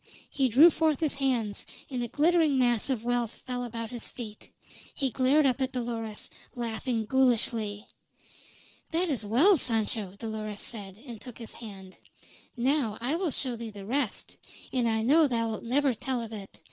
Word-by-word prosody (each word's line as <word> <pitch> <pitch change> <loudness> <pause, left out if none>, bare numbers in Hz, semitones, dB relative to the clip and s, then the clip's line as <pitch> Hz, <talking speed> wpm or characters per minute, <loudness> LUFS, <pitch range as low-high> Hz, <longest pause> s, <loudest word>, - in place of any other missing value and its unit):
He 265 -2 +2
drew 295 +9 +8
forth 315 -3 +1
his 310 -3 +1
hands, 245 -7 0 0.2
and 255 -3 -3
a 240 - -1
glittering 310 +1 +3
mass 240 -1 +2
of 245 -4 -1
wealth 240 -1 -1
fell 250 -1 -2
about 230 -1 -5
his 240 -2 -3
feet. 215 -4 -8 0.5
He 270 -2 0
glared 275 +4 +4
up 265 0 +2
at 260 0 0
Dolores, 230 -3 -4 0.3
laughing 230 -1 -2
ghoulishly. 230 -4 +1 1.0
"That 345 +2 +1
is 260 -7 0
well, 280 - +5
Sancho," 220 -6 0
Dolores 215 -2 -4
said, 200 -4 -5
and 235 -5 -8
took 250 -3 -9
his 230 -2 -7
hand. 195 -5 -10 0.6
"Now 245 -3 +1
I 255 +7 0
will 350 0 0
show 255 -3 -2
thee 230 -1 -6
the 200 -2 -9
rest; 255 0 -2 0.4
and 250 -2 +2
I 220 0 +1
know 300 +6 +5
thou'lt 230 -4 -1
never 270 +3 +2
tell 255 +2 -2
of 225 -1 -8
it. 200 -2 -8
240 Hz, 170 wpm, -29 LUFS, 220-270 Hz, 1.0 s, drew